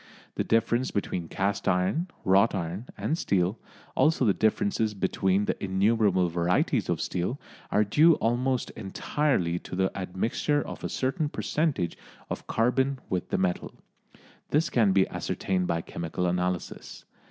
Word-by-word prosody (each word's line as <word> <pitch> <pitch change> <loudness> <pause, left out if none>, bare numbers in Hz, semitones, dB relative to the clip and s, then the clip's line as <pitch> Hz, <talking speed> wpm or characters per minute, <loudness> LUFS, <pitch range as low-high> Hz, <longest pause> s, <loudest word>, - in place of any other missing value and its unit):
The - - -1
difference 115 +3 +1
between 90 -4 -2
cast 100 +3 -1
iron, 95 - +1 0.2
wrought 100 +4 +4
iron 95 +6 -4
and 155 - 0
steel, 95 - 0 0.4
also 155 -4 +3
the 100 - +4
differences 110 0 +1
between 95 +1 +1
the - - -3
innumerable 100 -1 +2
varieties 85 +1 +1
of - - 0
steel, 90 +10 -2 0.3
are 105 - +3
due 155 +10 +5
almost 125 +2 0
entirely 95 - -1
to - - -8
the 95 +1 0
admixture 100 +10 -1
of - - -8
a - - -2
certain 135 +3 -1
percentage 145 - -1 0.3
of - - -5
carbon 130 +4 +1
with 90 -2 -1
the - - 0
metal. 90 -2 -1 0.7
This 155 -1 +1
can 110 -5 +4
be 95 0 +4
ascertained 90 -2 -2
by 85 -1 0
chemical 85 +2 -4
analysis. 90 0 -3
100 Hz, 140 wpm, -27 LUFS, 90-125 Hz, 0.7 s, due